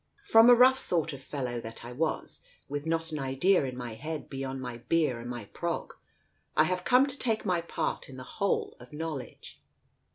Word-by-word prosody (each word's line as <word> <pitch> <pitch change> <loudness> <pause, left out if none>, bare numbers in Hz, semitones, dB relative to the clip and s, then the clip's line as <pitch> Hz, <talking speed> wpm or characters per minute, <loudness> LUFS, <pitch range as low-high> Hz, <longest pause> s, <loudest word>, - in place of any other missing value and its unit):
From 235 - +7
a 245 - +10
rough 260 +2 +6
sort 165 -5 0
of 135 - -8
fellow 125 -4 -4
that 115 +1 -8
I 120 - -7
was, 155 +6 -2 0.3
with 145 +2 -4
not 165 0 0
an 155 - -3
idea 135 +6 +2
in 130 -1 -5
my 120 -2 -5
head 155 +6 -6
beyond 135 -1 -4
my 125 -2 -6
beer 150 -2 +1
and 120 +1 -7
my 120 -4 -5
prog, - - -4 0.6
I 155 - +7
have 180 +2 -1
come 250 +6 +5
to 280 0 -2
take 225 -3 0
my 180 -3 +1
part 170 - -3
in 130 - -10
the 130 - -7
whole 200 +9 -1
of 125 +3 -14
knowledge. 155 -3 -6
150 Hz, 200 wpm, -29 LUFS, 125-180 Hz, 0.6 s, a